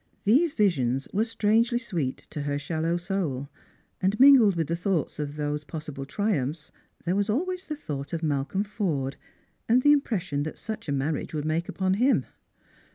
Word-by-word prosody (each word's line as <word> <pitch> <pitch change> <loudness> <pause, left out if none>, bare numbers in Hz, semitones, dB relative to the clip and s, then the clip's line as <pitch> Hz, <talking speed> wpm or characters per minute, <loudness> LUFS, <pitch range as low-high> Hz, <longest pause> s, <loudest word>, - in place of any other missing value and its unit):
These 285 +10 +3
visions 135 - +1
were 210 +3 +2
strangely 230 +1 +2
sweet 175 - -2
to 150 - -4
her 145 0 -1
shallow 160 +3 -1
soul: 170 -7 -2 0.5
and 195 +3 +1
mingled 255 -8 +8
with 165 -1 0
the 165 - -1
thoughts 170 -4 -1
of 145 -1 -3
those 150 0 -2
possible 150 -3 -6
triumphs 155 -5 -2 0.3
there 175 +2 +1
waa 200 0 +2
always 365 - -1
the 305 - -3
thought 145 - -6
of 165 -1 -3
Malcolm 150 +6 0
Forde, 165 - -2 0.5
and 250 +2 +4
the 290 - +7
impression 190 - +1
that 155 +2 -4
iuch 220 -5 -6
a - - -1
marriage 145 +3 -2
would 150 -1 -2
make 160 +2 -1
upon 190 -1 0
him. 250 +7 +3
170 Hz, 170 wpm, -27 LUFS, 145-215 Hz, 0.5 s, mingled